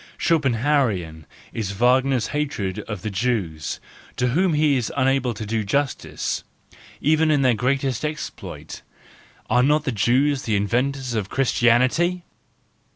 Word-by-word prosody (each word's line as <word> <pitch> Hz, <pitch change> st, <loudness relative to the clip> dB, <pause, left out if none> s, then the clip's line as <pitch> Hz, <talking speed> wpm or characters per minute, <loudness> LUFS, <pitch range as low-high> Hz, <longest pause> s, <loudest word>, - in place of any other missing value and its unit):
Schopenhauerian 120 Hz, -, +1 dB, 0.3 s
is 100 Hz, -3 st, -3 dB
Wagner's 125 Hz, +3 st, +2 dB
hatred 135 Hz, -11 st, -2 dB
of 105 Hz, -5 st, -6 dB
the 110 Hz, -, -3 dB
Jews, 95 Hz, -, -2 dB, 0.4 s
to 125 Hz, -, +1 dB
whom 170 Hz, +5 st, +2 dB
he 150 Hz, -1 st, +3 dB
is 125 Hz, -4 st, -1 dB
unable 130 Hz, -3 st, +1 dB
to 110 Hz, -, -5 dB
do 110 Hz, +1 st, -1 dB
justice, 140 Hz, +7 st, -2 dB, 0.6 s
even 155 Hz, +1 st, +3 dB
in 145 Hz, -3 st, +3 dB
their 130 Hz, -2 st, +4 dB
greatest 130 Hz, +2 st, -1 dB
exploit: 155 Hz, -1 st, -6 dB, 0.7 s
are 125 Hz, +2 st, +3 dB
not 150 Hz, +3 st, +3 dB
the 135 Hz, -, -1 dB
Jews 130 Hz, +6 st, +2 dB
the 110 Hz, -4 st, -1 dB
inventors 125 Hz, +5 st, 0 dB
of 105 Hz, -4 st, -2 dB
Christianity! 135 Hz, +8 st, +2 dB
125 Hz, 130 wpm, -23 LUFS, 110-145 Hz, 0.7 s, their